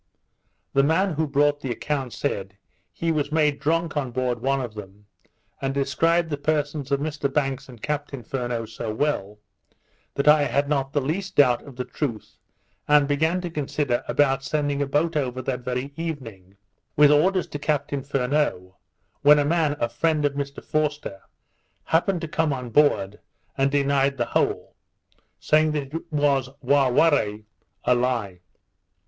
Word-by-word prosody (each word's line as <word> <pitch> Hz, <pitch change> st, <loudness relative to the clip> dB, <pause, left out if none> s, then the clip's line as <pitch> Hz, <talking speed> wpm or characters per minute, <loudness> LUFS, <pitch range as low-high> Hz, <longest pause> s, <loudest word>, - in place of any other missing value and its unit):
The 140 Hz, -, +5 dB
man 165 Hz, +6 st, +2 dB
who 155 Hz, +1 st, -1 dB
brought 145 Hz, +1 st, +2 dB
the 135 Hz, -, -4 dB
account 135 Hz, +1 st, -2 dB
said, 100 Hz, -8 st, -3 dB, 0.3 s
he 165 Hz, 0 st, -1 dB
was 150 Hz, -2 st, -1 dB
made 150 Hz, -2 st, +2 dB
drunk 165 Hz, +1 st, 0 dB
on 140 Hz, -4 st, -1 dB
board 125 Hz, -1 st, -2 dB
one 135 Hz, +1 st, +1 dB
of 120 Hz, -4 st, -5 dB
them, 105 Hz, -1 st, -11 dB, 0.6 s
and 135 Hz, 0 st, -2 dB
described 160 Hz, +5 st, +1 dB
the 145 Hz, -, -1 dB
persons 145 Hz, -2 st, -1 dB
of 140 Hz, -, +2 dB
Mr 145 Hz, -2 st, -2 dB
Banks 135 Hz, -2 st, -1 dB
and 120 Hz, -3 st, -13 dB
Captain 145 Hz, -3 st, -3 dB
Furneaux 120 Hz, -2 st, -3 dB
so 110 Hz, 0 st, -5 dB
well, 110 Hz, -5 st, -1 dB, 0.8 s
that 140 Hz, -, -1 dB
I 150 Hz, -1 st, +6 dB
had 140 Hz, 0 st, 0 dB
not 135 Hz, -2 st, 0 dB
the 145 Hz, -, +2 dB
least 180 Hz, +7 st, -3 dB
doubt 125 Hz, -4 st, +4 dB
of 140 Hz, -3 st, -13 dB
the 125 Hz, 0 st, -4 dB
truth, 120 Hz, -8 st, -5 dB, 0.5 s
and 150 Hz, -1 st, +5 dB
began 160 Hz, +5 st, +1 dB
to 175 Hz, -1 st, -5 dB
consider 145 Hz, -4 st, -1 dB
about 135 Hz, -2 st, +2 dB
sending 145 Hz, -1 st, -1 dB
a 140 Hz, -, 0 dB
boat 155 Hz, +4 st, 0 dB
over 130 Hz, -4 st, -1 dB
that 125 Hz, 0 st, -2 dB
very 125 Hz, +3 st, -4 dB
evening 115 Hz, -, -7 dB, 0.4 s
with 150 Hz, 0 st, +6 dB
orders 180 Hz, +5 st, +3 dB
to 145 Hz, -, -5 dB
Captain 145 Hz, -1 st, -1 dB
Furneaux, 130 Hz, -9 st, -1 dB, 0.4 s
when 150 Hz, +1 st, +7 dB
a 145 Hz, -, +2 dB
man, 155 Hz, -2 st, +1 dB
a 120 Hz, -, +1 dB
friend 150 Hz, +5 st, 0 dB
of 145 Hz, -, +1 dB
Mr 140 Hz, 0 st, -5 dB
Forster, 150 Hz, -9 st, -2 dB, 0.6 s
happened 175 Hz, +2 st, +1 dB
to 165 Hz, -, -4 dB
come 160 Hz, 0 st, 0 dB
on 125 Hz, -3 st, -4 dB
board 105 Hz, -8 st, +2 dB, 0.4 s
and 135 Hz, 0 st, +2 dB
denied 140 Hz, -1 st, +1 dB
the 120 Hz, -, 0 dB
whole, -, -, 0 dB, 0.6 s
saying 155 Hz, 0 st, +2 dB
it 150 Hz, +4 st, -5 dB
was 140 Hz, -3 st, +1 dB
wà 135 Hz, 0 st, +3 dB
warre, 115 Hz, -8 st, +2 dB, 0.4 s
a 125 Hz, -, +4 dB
lie. 120 Hz, -7 st, -1 dB
140 Hz, 165 wpm, -24 LUFS, 125-150 Hz, 0.8 s, when